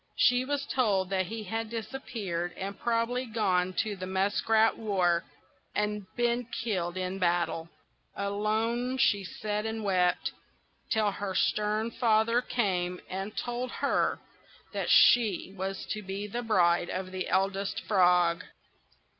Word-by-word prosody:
She 245 +1 +4
was 285 0 -1
told 200 -9 +1
that 185 -2 +1
he 225 +2 -5
had 225 +2 -3
disappeared, 215 -7 -4
had 195 +1 -5
probably 240 +2 0
gone 185 -5 +1
to 215 -2 -4
the 185 -1 -6
Muskrat 205 +4 +2
War, 185 -6 +1 0.5
and 210 -1 -1
been 240 0 +1
killed 185 -7 -2
in 185 +1 -3
battle. 170 -2 0 0.5
Alone 220 +5 -1
she 205 -6 +3
sat 210 +3 -3
and 220 0 -4
wept, 180 -2 +1 0.6
till 215 -2 +2
her 195 -1 -4
stern 215 +3 +1
father 230 0 +3
came 180 -7 -1
and 195 +3 -5
told 245 +1 -2
her - - +1 0.6
that - - -2
she 210 -5 +5
was 195 0 -4
to 215 - -2
be 195 +1 -5
the 235 +4 -4
bride 175 -6 +3
of 185 0 -4
the 185 0 -3
Eldest 195 +1 0
Frog. 180 -3 +4
205 Hz, 135 wpm, -29 LUFS, 185-225 Hz, 0.6 s, she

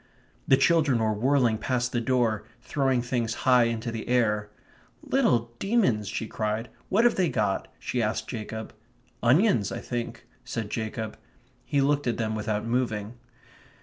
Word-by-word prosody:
The 135 - +6
children 155 -6 +3
were 110 -1 +1
whirling 120 0 +2
past 125 0 -1
the 120 - 0
door, 115 -4 +1 0.2
throwing 135 -4 +1
things 120 -2 -1
high 125 -2 +6
into 115 0 -2
the 115 -1 -5
air. 105 -4 +1 0.5
"Little 120 -1 +2
demons!" 190 - +2
she 110 - -3
cried. 110 +2 -2 0.2
"What 210 +4 +3
have 240 - +5
they 180 -3 +1
got?" 105 -2 0
she 125 - -2
asked 110 -1 -1
Jacob. 110 -2 -6 0.5
"Onions, 130 - +3
I - - -3
think," 120 -1 -5 0.2
said 110 -3 -4
Jacob. 110 -1 -4 0.5
He 140 - +1
looked 145 0 +1
at 115 - 0
them 110 -1 -1
without 110 0 -2
moving. 115 -3 -1
120 Hz, 150 wpm, -27 LUFS, 110-130 Hz, 0.5 s, The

